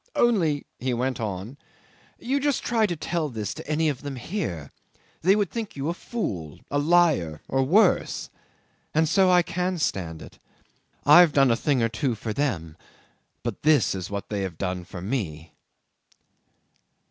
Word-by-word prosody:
"Only," 170 -12 +2
he 125 -1 -1
went 130 0 -1
on, 110 +5 -5 0.6
"you 270 +4 -1
just 285 -1 0
try 225 -3 +2
to 175 - -2
tell 165 0 -2
this 110 -4 -4
to - - -10
any 155 +1 +1
of 140 -3 -2
them 140 -1 -5
here. 115 - -4 0.5
They 190 +4 +5
would 205 -2 0
think 225 -3 -5
you 140 +2 -2
a - - 0
fool, 95 - -5
a 145 - +1
liar, 150 - +2
or 135 - +1
worse. 185 +9 +2 0.6
And 160 +1 +3
so 185 +3 +4
I 180 -1 +5
can 180 +1 -2
stand 85 - -2
it. - - -14 0.7
I've 155 +1 +8
done 135 -3 +5
a - - +4
thing 130 0 +1
or 115 - +2
two 120 +1 -1
for 110 +1 -4
them, 95 - -2 0.7
but - - -4
this 145 - +4
is 95 -2 -5
what 100 -1 -5
they 105 -2 -2
have 95 -4 -4
done 90 -1 -3
for 90 -1 -8
me." 85 - -4
140 Hz, 170 wpm, -25 LUFS, -, 0.7 s, I've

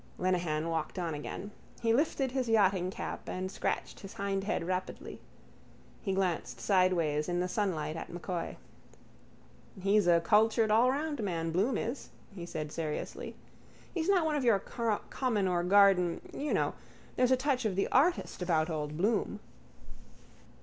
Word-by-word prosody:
Lenehan 175 -4 0
walked 165 +2 -2
on 170 -3 -2
again. 165 +7 -6 0.3
He 230 -1 +2
lifted 270 -1 +1
his 255 -2 -1
yachtingcap 190 -4 +1
and 185 +1 -3
scratched - - -3
his 195 - -10
hindhead 200 0 -1
rapidly. 185 +1 -4 0.8
He 195 - -2
glanced 175 -10 -1
sideways 165 0 +2
in 175 0 0
the 180 - 0
sunlight 180 -6 -1
at 165 - -6
M'Coy. 175 0 -4 1.2
—He's 200 0 +3
a 170 -1 +6
cultured 215 +4 +3
allroundman, 230 - +1
Bloom 200 +10 +1
is, 240 +5 -4 0.2
he 175 -3 -7
said 155 -3 -4
seriously. 155 -2 -4 0.6
He's 335 0 -1
not 370 -5 +4
one 310 -1 +1
of 285 - 0
your 230 -4 +5
common 225 0 -1
or 175 -1 +1
garden... 185 -2 +4
you 295 +1 -3
know... - - +1 0.4
There's 250 -1 +3
a 260 - +5
touch 260 -1 0
of 205 -4 0
the 195 - +1
artist 310 - +2
about 165 -2 +1
old 150 -1 -3
Bloom. 210 +2 0
195 Hz, 145 wpm, -31 LUFS, 170-230 Hz, 1.2 s, a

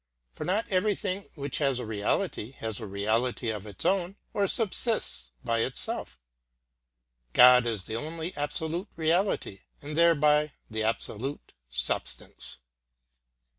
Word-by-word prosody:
For - - -6
not 205 +5 0
everything 195 0 0
which 140 -3 -2
has 135 -4 +2
a 125 - -3
reality 110 +2 -1
has 110 -5 -4
a 110 - -6
reality 110 +4 0
of 105 -1 -6
its 100 - -6
own, 190 0 +1 0.2
or 200 -1 +2
subsists 200 - 0
by 115 0 0
itself. 65 - -2 1.1
God 125 -1 +8
is 110 -5 -1
the 110 +4 -4
only 160 +5 -5
absolute 160 +5 0
reality, 165 - 0 0.2
and 150 +1 -6
thereby 150 -3 +4 0.2
the 110 0 -2
absolute 115 +4 -2 0.2
substance. 60 0 -1
140 Hz, 125 wpm, -28 LUFS, 110-170 Hz, 1.1 s, God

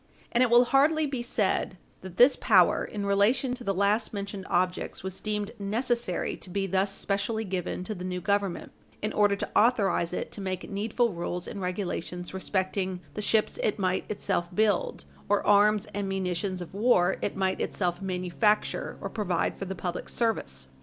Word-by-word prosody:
And 240 - +2
it 255 - +4
will 240 +1 +7
hardly 300 +5 +3
be 270 -4 -3
said 210 -5 0 0.2
that 185 -2 -10
this 250 +3 +7
power, 185 -7 +4
in 205 -2 -4
relation 205 +6 +2
to 250 -1 -7
the 200 - 0
last 200 +4 +1
mentioned 200 -1 -5
objects, 180 +1 -1
was 190 0 -6
deemed 210 0 -2
necessary 230 -1 -1
to - - -9
be 195 +2 -1
thus 195 +1 +1
specially 205 +3 -1
given 180 -1 -3
to 215 - -4
the 180 -3 -7
new 180 0 -3
Government 200 -1 -1 0.3
in 215 - -1
order 205 -1 +3
to - - -4
authorize 205 -7 +3
it - - -4
to 205 - -6
make 185 -2 -4
needful 215 +2 0
rules 175 +1 -4
and 200 - -6
regulations 180 -1 -4
respecting 190 -1 -1
the 210 - -4
ships 215 +1 +1
it 215 - 0
might 185 -2 -1
itself 195 -4 -1
build, 210 -3 +1 0.2
or 205 0 +2
arms 210 0 +4
and 200 -1 -2
munitions 185 -1 -2
of 175 - -13
war 195 -4 +3
it - - -2
might 190 -1 0
itself 180 -1 -1
manufacture 190 +3 0
or - - -3
provide 185 -6 -1
for 195 - -5
the 190 0 -5
public 175 -1 -4
service. 65 - -2
200 Hz, 180 wpm, -28 LUFS, 185-215 Hz, 0.3 s, will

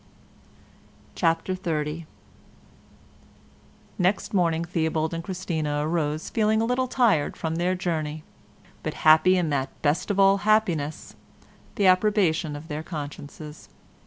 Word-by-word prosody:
CHAPTER 165 +1 0
XXX 160 -3 -3 1.9
Next 185 +4 0
morning 170 -3 +1
Theobald 160 -2 -1
and 165 0 -4
Christina 160 -5 -2
arose 155 -2 -2
feeling 220 -1 +2
a 225 - +1
little 250 +2 0
tired 235 - +2
from 160 0 -3
their 180 +2 +1
journey, 155 -4 -3 0.6
but 155 - -4
happy 160 +4 +6
in 170 -4 0
that 135 -2 -2
best 150 +6 +1
of 200 -1 0
all 195 0 +6
happiness, 190 -9 0 0.6
the 200 - +1
approbation 185 -5 +3
of 145 +2 -9
their 150 -1 -4
consciences. 150 -1 -8
165 Hz, 120 wpm, -25 LUFS, 155-185 Hz, 1.9 s, happy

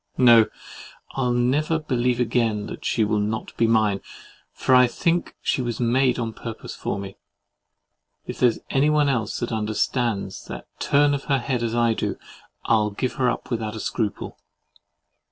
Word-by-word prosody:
No, 120 -3 +7 0.6
I'll 125 -2 0
never 135 +7 +1
believe 125 -5 0
again 115 -3 +1
that - - -8
she 110 - +1
will 105 0 +1
not 105 +2 -3
be 115 - +2
mine; 110 -3 +2 0.5
for 130 - 0
I 125 0 +7
think 170 +8 -1
she - - +1
was 120 -3 -3
made 125 +1 +2
on 115 -2 -3
purpose 115 0 -7
for - - -3
me. 100 -1 -7 1.1
If - - -7
there's 120 -3 +3
anyone 150 +1 +3
else 115 -6 -1
that 120 - -2
understands 110 -2 -1
that - - -8
turn 145 0 +3
of 140 - -3
her 140 - +2
head 125 -1 -2
as 115 0 -1
I 120 -1 +3
do, - - -3 0.5
I'll 110 -2 +3
give 125 +5 -3
her 125 - +4
up 120 - -4
without 110 -2 -3
scruple. 110 -1 -3
120 Hz, 160 wpm, -23 LUFS, 110-130 Hz, 1.1 s, No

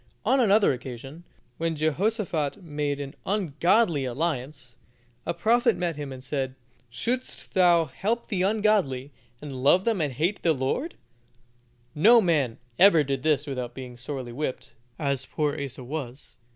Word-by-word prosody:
On 270 - +3
another 210 - +4
occasion, 135 +6 -8 0.3
when 165 0 -1
Jehosophat 170 +1 -1
made 145 -3 -2
an 140 -1 -6
ungodly 175 -2 +2
alliance, 130 -2 -3 0.5
a - - 0
prophet 235 +2 +3
met 175 -2 -1
him 145 -2 -6
and 130 -1 -9
said, 135 -1 -3 0.3
"Should'st 240 - -3
thou 175 -3 +5
help 210 - -2
the 195 -6 -1
ungodly, 195 -10 +1 0.3
and 135 -3 -6
love 175 +8 +5
them 225 -4 +1
that 145 -4 -1
hate 170 - -1
the 165 - +3
Lord?" 145 - -2 1.0
No 225 +10 +6
man 150 - +1 0.2
ever 175 -5 +7
did 135 -1 -2
this 150 -1 +2
without 125 -4 -5
being 125 -2 -8
sorely 130 0 -6
whipped, 130 +1 -4 0.2
as 140 -3 -1
poor 150 -1 -1
Asa 135 -2 -5
was. 135 -1 -6
150 Hz, 145 wpm, -26 LUFS, 135-185 Hz, 1.0 s, ever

